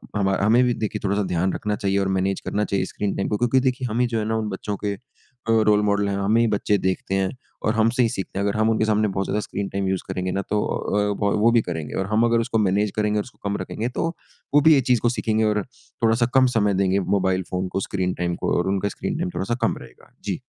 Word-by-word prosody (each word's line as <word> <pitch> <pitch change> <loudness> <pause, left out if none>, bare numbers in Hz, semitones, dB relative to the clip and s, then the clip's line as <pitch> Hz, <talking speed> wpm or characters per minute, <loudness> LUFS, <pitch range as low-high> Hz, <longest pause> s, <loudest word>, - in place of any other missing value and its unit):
हमा 95 -2 +1
हमें 115 +5 +4
भी 125 -1 +2
देखिए 110 -2 -3
थोड़ा-सा 100 0 +1
ध्यान 90 +1 0
रखना 105 0 -2
चाहिए 100 -1 0
और 95 - 0
मैनेज 95 +1 0
करना 105 - 0
चाहिए 100 -1 -1
स्क्रीन 105 -1 -3
टाइम 100 - -1
को। 105 - 0
क्योंकि 120 +2 +3
देखिए 130 0 0
हम 115 - -1
ही 125 - +3
जो 115 -1 -1
है 105 - -2
ना 110 - 0
उन 110 -1 -2
बच्चों 100 +2 -4
के 100 - 0
अ, - - -8 0.5
रोल 110 -2 +4
मॉडल 100 0 +1
हैं 100 - -1
हमें 105 +3 +2
ही - - +4
बच्चे 105 -1 +1
देखते 95 +1 -1
हैं, 95 -1 +1 0.4
और 110 - +2
हमसे 115 +3 +3
ही 115 - +2
सीखते 95 -1 -4
हैं। 100 - 0
अगर 100 0 0
हम 110 +1 +3
उनके 110 -1 +2
सामने 110 0 +2
बहुत 95 0 -2
ज़्यादा 105 - -1
स्क्रीन 100 0 -4
टाइम 100 -1 -2
यूज़ 95 -1 0
करेंगे 95 -1 -2
ना 100 - -1
तो 105 0 +1
अ, 100 0 0
वो 115 +3 +5
भी 115 -1 +4
करेंगे 80 -5 -5
और 95 - 0
हम 110 +2 +3
अगर 115 0 +3
उसको 115 0 -1
मैनेज 100 0 +1
करेंगे 105 0 +1
और - - -1
उसको 105 -5 -7
कम 100 - -1
रखेंगे 115 +3 -3
तो - - +1 0.5
वो 145 - +6
भी 160 +1 +7
ये 135 - +4
चीज़ 120 -3 +3
को 120 - +3
सीखेंगे 110 -2 0
और 105 -1 +2 0.4
थोड़ा-सा 115 +1 +3
कम 130 -1 +6
समय 105 -2 +2
देंगे 95 +1 +2
मोबाइल 95 -1 +1
फ़ोन 95 0 -1
को, 95 - -2
स्क्रीन 95 -2 -2
टाइम 85 -1 -2
को - - -1
और 90 - 0
उनका 100 +1 0
स्क्रीन 130 - -4
टाइम 180 +2 -1
थोड़ा-सा 120 +5 -1
कम - - +1
रहेगा। - - -15
जी। - - -3
105 Hz, 265 wpm, -23 LUFS, 95-110 Hz, 0.5 s, भी